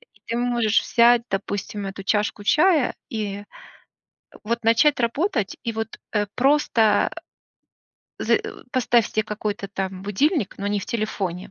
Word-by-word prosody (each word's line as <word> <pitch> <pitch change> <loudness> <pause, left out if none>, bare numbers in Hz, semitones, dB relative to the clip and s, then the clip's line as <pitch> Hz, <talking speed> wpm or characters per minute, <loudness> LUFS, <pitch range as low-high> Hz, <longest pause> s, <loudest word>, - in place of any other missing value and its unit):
И - - -24 0.2
ты 230 - -2
можешь 240 -3 +2
взять, 235 0 +4
допустим, 200 +1 -3
эту 195 0 -6
чашку 210 0 0
чая 310 - +3 0.2
и, 210 -3 -3
э, - - -12 1.0
вот, 230 +1 -2
начать 240 +6 +4
работать, 235 - 0
и - - 0
вот, 220 0 -5
э, 210 -1 +1
просто, 245 -6 +3 1.1
э - - -2
з - - -4
э, - - -7
поставь 240 -3 +3
себе 215 - 0
какой-то, 210 -2 -4
там, 190 -1 -4
будильник, 255 - 0
но 200 - -3
не 205 0 0
в - - -6
телефоне. 195 -5 -3
220 Hz, 150 wpm, -23 LUFS, 200-240 Hz, 1.1 s, взять